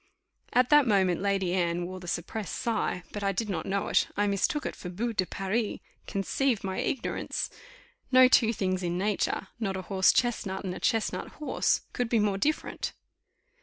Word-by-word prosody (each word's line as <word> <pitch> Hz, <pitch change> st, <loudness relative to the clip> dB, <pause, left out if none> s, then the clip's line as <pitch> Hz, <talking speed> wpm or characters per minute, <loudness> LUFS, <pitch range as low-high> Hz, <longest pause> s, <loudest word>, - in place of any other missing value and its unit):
At 250 Hz, +2 st, +3 dB
that 295 Hz, -3 st, +7 dB
moment, 190 Hz, -5 st, +3 dB
Lady 195 Hz, -3 st, +1 dB
Anne 175 Hz, -1 st, 0 dB
wore 185 Hz, +1 st, -6 dB
the 180 Hz, -, -10 dB
suppressed 180 Hz, +5 st, -3 dB
sigh, 225 Hz, -6 st, -1 dB
but 205 Hz, -, -5 dB
I 195 Hz, -, +2 dB
did 210 Hz, +3 st, -2 dB
not -, -, -3 dB
know 200 Hz, +1 st, -1 dB
it -, -, +3 dB
I 205 Hz, -, +3 dB
mistook 205 Hz, +9 st, 0 dB
it -, -, -3 dB
for 180 Hz, -, -7 dB
boue 230 Hz, +6 st, -2 dB
de 185 Hz, -4 st, 0 dB
Paris 205 Hz, +3 st, -1 dB, 0.3 s
conceive 225 Hz, +4 st, 0 dB
my 190 Hz, -1 st, -2 dB
ignorance! 265 Hz, -, -2 dB, 0.6 s
No 255 Hz, 0 st, +8 dB
two 230 Hz, -3 st, +5 dB
things 185 Hz, -4 st, -1 dB
in 175 Hz, -1 st, -1 dB
nature, 195 Hz, -1 st, -1 dB
not 195 Hz, -4 st, -1 dB
a 185 Hz, -, -5 dB
horse 190 Hz, 0 st, +4 dB
chestnut 205 Hz, -6 st, 0 dB
and 185 Hz, -2 st, -3 dB
a -, -, -7 dB
chestnut 225 Hz, -1 st, 0 dB
horse, 300 Hz, -, 0 dB
could 245 Hz, -3 st, -1 dB
be 235 Hz, -, +3 dB
more 205 Hz, -2 st, +1 dB
different. 305 Hz, +8 st, -1 dB
200 Hz, 185 wpm, -28 LUFS, 185-230 Hz, 0.6 s, No